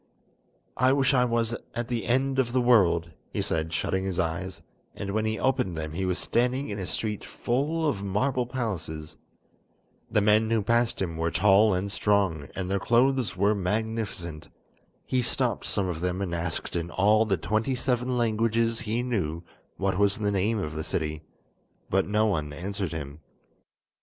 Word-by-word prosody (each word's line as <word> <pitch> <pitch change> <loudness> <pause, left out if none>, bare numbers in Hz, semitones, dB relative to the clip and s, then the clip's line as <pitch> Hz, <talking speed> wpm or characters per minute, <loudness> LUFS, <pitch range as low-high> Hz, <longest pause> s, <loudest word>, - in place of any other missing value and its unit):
"I 130 +1 +4
wish 140 0 +3
I 125 -1 +4
was 115 -1 0 0.2
at 120 0 -2
the 120 -2 -2
end 135 +2 +1
of 120 -2 +1
the 130 - +3
world," 95 -9 +4 0.2
he - - -4
said, 80 0 -1
shutting 95 +2 -1
his 95 -2 -3
eyes, 85 +3 -2 0.3
and 100 -1 -4
when 110 +1 0
he 110 0 0
opened 95 -10 0
them 80 -1 -4
he 95 +4 -2
was 90 -1 0
standing 125 +5 0
in 100 0 -4
a 95 - -4
street 105 -2 -2
full 150 +6 -1
of 120 -9 -1
marble 120 +6 0
palaces. 85 - -4 0.9
The - - +3
men 105 +2 +4
who 115 -2 +2
passed 115 +2 +2
him 85 -3 -4
were 80 +1 0
tall 100 +4 +4
and 95 +2 -2
strong, 95 -9 +1
and 95 -1 -3
their 100 +1 0
clothes 120 -4 +2
were 100 +3 +3
magnificent. 100 -5 -3 0.6
He 130 - +1
stopped - - -1
some 95 - 0
of 85 -2 -4
them 90 +1 -1
and 95 -3 -2
asked 85 0 -3
in 85 0 -2
all 105 +4 +4
the 100 -3 +1
twenty 110 +10 0
seven 125 0 0
languages 115 0 +1
he 115 +1 -1
knew 90 -10 -2 0.3
what 95 0 0
was 100 -1 +3
the 105 -1 0
name 100 +3 +1
of 80 -6 -3
the 80 0 -3
city, 75 -1 -2 0.7
but 95 +1 +2
no 105 +2 +2
one 75 -8 -1
answered 95 +3 -3
him. 75 -2 -6
105 Hz, 175 wpm, -27 LUFS, 90-115 Hz, 0.9 s, I